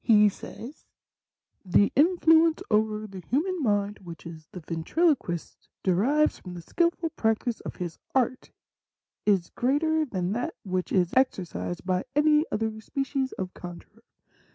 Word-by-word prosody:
He 210 -2 +6
says, 240 +7 -10 0.8
'The 195 +2 +3
influence 325 +1 +4
over 215 0 +1
the 195 -3 -9
human 315 - -1
mind 205 -4 0
which 170 -3 -10 0.3
the 180 - -7
Ventriloquist 175 - -1
derives 250 - +2
from 180 -2 -9
the 170 - -8
skilful 340 - 0
practice 225 0 0
of - - -7
his 175 -3 -6 0.2
art 255 0 +1 0.8
is 190 -5 +2
greater 310 +5 +1
than 185 -8 -2
that 245 +10 -2
which 185 -2 -2
is 180 -3 +2
exercised 170 - 0
by 185 0 0
any 300 +1 +4
other 220 0 -2
species 270 +1 -2
of 185 -1 -5
con 175 -1 -8
jurer. - - -26
220 Hz, 135 wpm, -27 LUFS, 185-295 Hz, 0.8 s, He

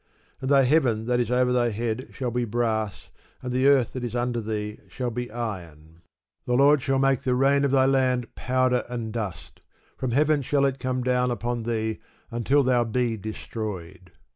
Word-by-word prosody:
And 130 - -2
thy 140 -1 +5
heaven 125 -6 +2
that 125 0 +1
is 120 - 0
over 125 0 +2
thy 120 -1 +2
head 115 +3 -3
shall 125 -3 -3
be 120 +1 0
brass, 110 -2 -2 0.3
and 125 -1 -3
the 130 +2 +3
earth 135 -4 +4
that 130 - -5
is 120 0 -4
under 120 -1 -1
thee 105 -1 -4
shall 120 +7 -4
be 125 +1 -4
iron. 85 -9 -7 0.4
The 125 - +1
Lord 140 +2 +5
shall 135 +1 +1
make 135 -1 +2
the 130 -3 0
rain 140 +2 +3
of 140 - +2
thy 130 0 +4
land 130 -2 +1
powder 130 -1 +1
and 115 -3 -4
dust: 105 -7 -6 0.3
from 130 - -3
heaven 150 +4 +2
shall 140 +1 +1
it 135 0 -1
come 130 -1 -2
down 125 0 +1
upon 120 0 -2
thee, 110 -1 -2 0.3
until 130 +5 +2
thou 125 -2 +3
be 120 0 0
destroyed. 95 -4 -7
125 Hz, 190 wpm, -25 LUFS, 110-130 Hz, 0.4 s, thy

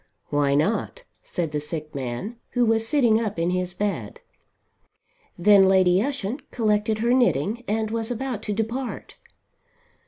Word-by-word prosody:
"Why 145 -1 +2
not?" 215 - 0 0.2
said 165 -4 -3
the 150 - -1
sick 150 +1 -6
man, 135 - -5 0.2
who 245 -1 +3
was 225 0 +2
sitting 235 -5 +3
up 210 -4 -4
in 170 +2 0
his 180 0 -2
bed. 205 - -3 1.2
Then 200 +3 +6
Lady 190 -1 +4
Ushant 265 0 -3
collected 215 -1 +1
her 235 +3 +1
knitting 240 - +1
and 220 +1 -1
was 225 0 -2
about 245 -2 -3
to - - +1
depart. 230 +5 -4
210 Hz, 145 wpm, -24 LUFS, 180-235 Hz, 1.2 s, Then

